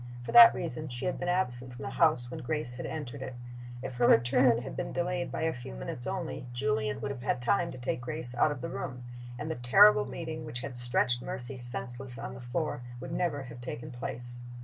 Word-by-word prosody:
For - - -5
that 235 -1 +10
reason 155 -2 -4
she 120 -2 -5
had 180 - -1
been 175 - -2
absent 125 -9 -1
from 135 - -8
the 135 - -4
house 130 -5 +3
when - - -5
Grace 150 -2 -3
had 125 - -6
entered 145 -4 -6
it. 130 -1 -6 0.5
If 130 - -5
her 120 -1 +4
return 120 0 +4
had 135 - -7
been - - -3
delayed 175 0 -2
by - - -3
a 160 - +1
few 120 - -8
minutes - - -5
only, 175 -8 -4
Julian 120 -5 -1
would 140 - -2
have 130 -3 -7
had 125 - 0
time 170 +8 +1
to - - -9
take 120 0 -3
Grace 125 -1 -2
out 125 +5 +3
of 145 - -5
the 165 - -4
room, 125 -5 -5 0.3
and 150 +5 -4
the - - 0
terrible 200 +13 +6
meeting 160 -2 -5
which 120 +1 -1
had 135 -1 -6
stretched 120 0 +2
Mercy 125 +2 -5
senseless 120 0 +2
on - - -6
the - - -9
floor 125 +2 -3 0.2
would 130 +2 -7
never 155 -6 -1
have 120 -1 -10
taken 125 +3 -6
place. 120 0 -6
130 Hz, 225 wpm, -30 LUFS, 120-155 Hz, 0.5 s, that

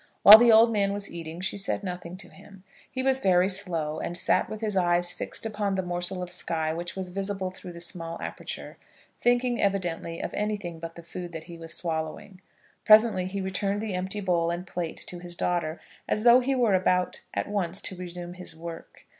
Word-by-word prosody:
While 215 +2 +13
the 240 0 +6
old 225 +1 +7
man 200 -2 +1
was 200 0 -4
eating 165 0 -7
she 190 +2 -1
said 200 +1 -1
nothing 180 -1 -6
to 195 - -8
him. 195 -2 -16 0.3
He 260 -1 -3
was 265 0 +3
very 185 -5 +3
slow, 170 -6 0
and 175 - -4
sat - - +2
with 215 - -6
his 215 -2 -1
eyes 175 -1 +2
fixed - - -3
upon 205 -2 -1
the 190 - -1
morsel 180 +1 0
of 180 - -7
sky 160 -1 -1
which 175 +1 -5
was 190 -1 -4
visible 195 0 -2
through 185 -1 -10
the 170 - -10
small 170 -1 -4
aperture, - - -7 0.4
thinking 245 0 +2
evidently 175 -4 -1
of - - -5
anything 205 -6 -3
but 165 0 -7
the 170 - -11
food 175 +1 -8
that 160 -1 -6
he 170 +1 -10
was 165 0 -6
swallowing. 165 +3 -4 0.4
Presently 215 -4 +6
he 195 +1 -4
returned 195 +2 -1
the 215 -2 -3
empty 190 +3 -3
bowl 175 -3 +1
and 175 +1 -3
plate 175 -3 -4
to 175 - -7
his 175 0 -5
daughter, 170 -2 -1 0.3
as 210 - +1
though 240 +1 +8
he 265 +2 0
were 240 -5 +2
about 180 -1 +1
at - - -1
once 195 -3 -2
to 190 - -4
resume 175 -1 -7
his 180 -2 -6
work. 165 0 -10
185 Hz, 205 wpm, -27 LUFS, 170-205 Hz, 0.4 s, While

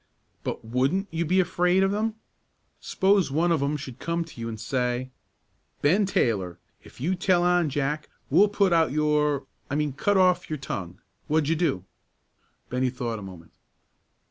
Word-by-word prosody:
"But - - -4
wouldn't 135 - 0
you 165 +1 -1
be 185 +4 +2
afraid 180 +1 +2
of 195 +1 +1
'em? 215 +1 -1 0.6
s'pose 195 -2 +2
one 165 +5 +1
of 160 -4 +2
'em 145 +2 0
should 130 -3 -9
come 170 0 -2
to 150 -7 -11
you 115 - -3
an' 110 - -5
say, 125 +2 -2 0.7
'Ben 190 +8 +3
Taylor, 95 - 0 0.3
if - - -16
you 165 +9 0
tell 180 -1 +2
on 175 -3 +3
Jack, 145 +2 -2 0.2
we'll 205 +1 +6
put 200 -3 +2
out 165 -4 +3
your' 150 -1 +1 0.2
I 140 - -2
mean 150 -2 0
'cut 200 +9 +1
off 180 -1 +3
your 155 - -2
tongue.' 95 -9 -6 0.3
What'd 155 -1 +1
you 165 - +3
do?" 150 - 0 0.8
Bennie 125 +1 0
thought 120 -3 -4
a - - -9
moment. 90 -4 -11
150 Hz, 170 wpm, -26 LUFS, 125-180 Hz, 0.8 s, we'll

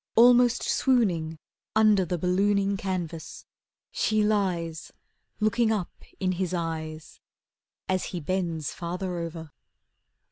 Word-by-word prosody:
Almost 245 +1 +6
swooning 180 - +1 0.4
Under 215 -3 +5
the 175 +1 -2
ballooning 195 +3 +2
canvas, 175 -5 -5 0.5
She 215 -1 +1
lies 180 -6 -1 0.5
Looking 220 +1 +2
up 205 -5 -1 0.3
in 185 -1 +1
his 185 0 -2
eyes 160 -2 -5 0.7
As 185 -1 0
he 180 - -4
bends 165 -2 -2
farther 180 +1 -4
over. 165 -2 -6
185 Hz, 105 wpm, -27 LUFS, 165-210 Hz, 0.7 s, Almost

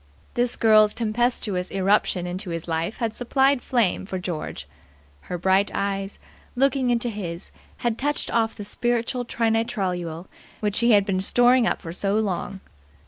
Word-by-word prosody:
This 240 0 +1
girl's 215 -1 +5
tempestuous 215 -5 0
irruption 195 -2 +1
into 180 +2 -4
his 165 0 -4
life 165 +5 -2
had 225 -2 -2
supplied 265 +2 +2
flame 225 -7 0
for 190 - -3
George. 180 -4 -5 0.6
Her 180 - -2
bright 190 +3 +2
eyes, 195 0 -2 0.4
looking 270 0 +2
into 240 0 +1
his, 185 -6 -5 0.3
had 235 -2 -2
touched 290 +2 -1
off 225 -1 +1
the 205 - -7
spiritual 240 +3 -1
trinitrotoluol 195 -8 -1 0.3
which 210 -1 0
he 235 -1 +4
had 200 -1 +5
been 190 -2 0
storing 245 +4 +4
up - - -1
for 165 - -6
so 195 +2 -1
long. 195 -2 -2
210 Hz, 150 wpm, -24 LUFS, 185-240 Hz, 0.6 s, girl's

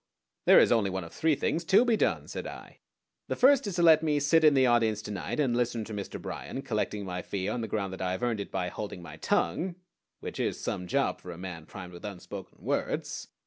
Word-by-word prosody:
"There - - +8
is - - +6
only 110 -4 +3
one 95 -1 -3
of 85 - -11
three 160 -2 +2
things 160 +4 -1
to 195 +7 +5
be 235 -2 +3
done," - - 0
said - - -5
I. - - -10 0.5
"The - - -1
first 270 -2 +5
is 195 - -3
to 175 - +2
let 160 -2 +7
me 150 -2 +1
sit 160 +3 +4
in 150 -2 +6
the 130 -1 +5
audience 115 -3 +3
to 105 - -6
night 100 +8 -4
and 130 -5 +2
listen 120 -2 0
to 110 - -7
Mr. 100 -2 -5
Bryan, 135 - -6
collecting 105 -4 -2
my 90 -1 -4
fee 95 +1 -3
on 125 - -1
the 110 - -3
ground 100 -3 -2
that 95 - -7
I 90 0 0
have 95 - -4
earned 120 -3 0
it 100 - -5
by 90 -2 -2
holding 95 -2 -6
my - - -10
tongue 180 0 0 0.4
which - - -7
is - - -1
some 90 - -3
job - - 0
for 90 - -10
a 85 - -8
man 90 -3 -7
primed 90 -3 -9
with 85 - -11
unspoken 100 -4 -8
words. - - -2
110 Hz, 245 wpm, -29 LUFS, 95-150 Hz, 0.5 s, There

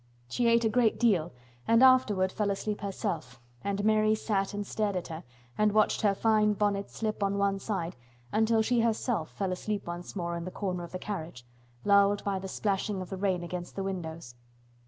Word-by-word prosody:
She 240 - +1
ate 230 0 +4
a - - +5
great 225 0 +2
deal 190 -9 +2 0.4
and 230 +2 +5
afterward 215 -8 +5
fell 210 0 -1
asleep 205 +1 -2
herself, 130 - -4 0.2
and 200 0 -1
Mary 215 0 +4
sat 200 -3 -1
and 205 0 -4
stared 205 -1 -1
at 180 - -3
her 160 +1 -6 0.4
and 210 -1 +3
watched 215 -1 +3
her 205 -2 +3
fine 215 0 +3
bonnet 200 -1 0
slip 215 -1 -3
on 200 0 +1
one 200 0 +1
side 190 -5 -3 0.4
until 220 0 +3
she 240 +2 +2
herself 225 -6 0
fell 195 -3 -3
asleep 205 +2 -3
once 175 +2 -6
more 170 -2 -2
in 170 0 -4
the - - -4
corner 185 -2 -3
of 170 - -9
the 185 - -4
carriage, 165 -11 -6 0.4
lulled 200 0 +4
by 195 -1 -1
the 190 - -6
splashing 200 +1 -1
of 185 0 -7
the - - -2
rain 185 -2 0
against 175 0 -6
the 195 - -2
windows. 165 -8 -5
200 Hz, 200 wpm, -29 LUFS, 185-215 Hz, 0.4 s, a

